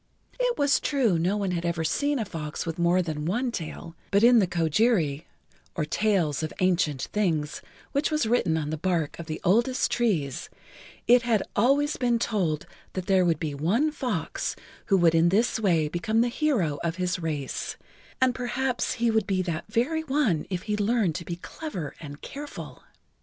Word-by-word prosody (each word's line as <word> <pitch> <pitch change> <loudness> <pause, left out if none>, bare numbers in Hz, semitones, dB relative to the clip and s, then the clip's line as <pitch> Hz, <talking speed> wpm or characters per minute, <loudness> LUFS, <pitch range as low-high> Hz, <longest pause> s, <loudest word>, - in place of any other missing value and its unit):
It - - +1
was 285 0 +3
true 240 - +1
no 185 +5 +1
one 200 -3 -1
had 170 -1 -2
ever 170 -1 -1
seen 285 - +1
a 225 - -1
fox 155 -5 -5
with 165 +1 -4
more 175 +2 +3
than 155 -3 -4
one 240 +7 0
tail, 165 -3 -6
but 200 +2 +3
in 240 0 +7
the 195 - +3
Kojiri, 165 - +1 0.5
or 155 - -1
Tails 170 -5 +1
of 155 - -3
Ancient 170 -7 +1
Things, 160 -8 0 0.3
which 280 +2 +1
was 305 -5 +1
written 220 -8 +2
on 150 -1 -2
the 155 - -3
bark 170 -4 -1
of 170 - -7
the 155 - -4
oldest 235 +8 +2
trees, 175 - 0 0.6
it 245 +1 +6
had 230 -4 +1
always 280 +7 +3
been 240 -2 +2
told 185 -10 -1 0.3
that 185 -1 -4
there 190 -2 +4
would 165 -3 +1
be 155 -3 -3
one 200 - +1
fox 245 - -3 0.3
who 195 - +4
would 170 -3 +4
in 165 +1 +4
this 225 +5 +2
way 170 -7 +2
become 175 +8 0
the 240 - +2
hero 235 - 0
of 165 -1 -1
his 180 +1 -1
race, 150 -5 -3 0.4
and 260 -1 +3
perhaps 250 0 -1
he 235 0 +1
would 220 -3 +1
be 185 -2 +1
that 170 -3 -3
very 260 +9 0
one 265 - +1
if 185 -2 -3
he 210 -1 -1
learned 210 -3 +1
to 170 +1 -6
be 170 - -4
clever 180 - -6
and 145 -2 -10
careful. 290 +1 -8
185 Hz, 185 wpm, -26 LUFS, 165-240 Hz, 0.6 s, in